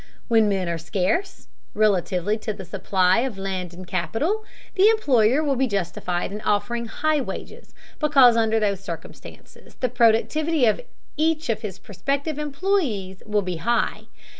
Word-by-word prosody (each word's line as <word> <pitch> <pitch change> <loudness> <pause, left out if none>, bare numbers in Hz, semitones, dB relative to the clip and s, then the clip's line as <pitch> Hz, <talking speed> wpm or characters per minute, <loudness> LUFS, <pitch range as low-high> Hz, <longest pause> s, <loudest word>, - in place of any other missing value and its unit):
When 225 -2 +4
men 190 -3 -1
are 170 -1 -2
scarce, 195 - -2 0.3
relatively 200 -1 +1
to 215 0 -3
the 195 -2 -9
supply 185 +1 +2
of 245 -4 -2
land 190 -2 -4
and 180 +1 -10
capital, 320 - -1 0.3
the 400 +2 +5
employer 275 - +3
will 280 -3 +1
be 265 +1 +1
justified 180 -3 -2
in 210 +1 -6
offering 210 +4 -1
high 310 +4 0
wages, - - -8 0.2
because 275 -6 +6
under 225 -1 +2
those 200 -3 0
circumstances 170 -4 -11
the 255 - -1
productivity 250 +6 +2
of 215 - +2 0.4
each 310 -2 0
of 220 -1 0
his 205 -5 -6
prospective 280 - -3
employees 280 - -1
will 210 -1 +1
be 180 -2 -3
high. 235 +8 -1
220 Hz, 150 wpm, -23 LUFS, 195-280 Hz, 0.4 s, because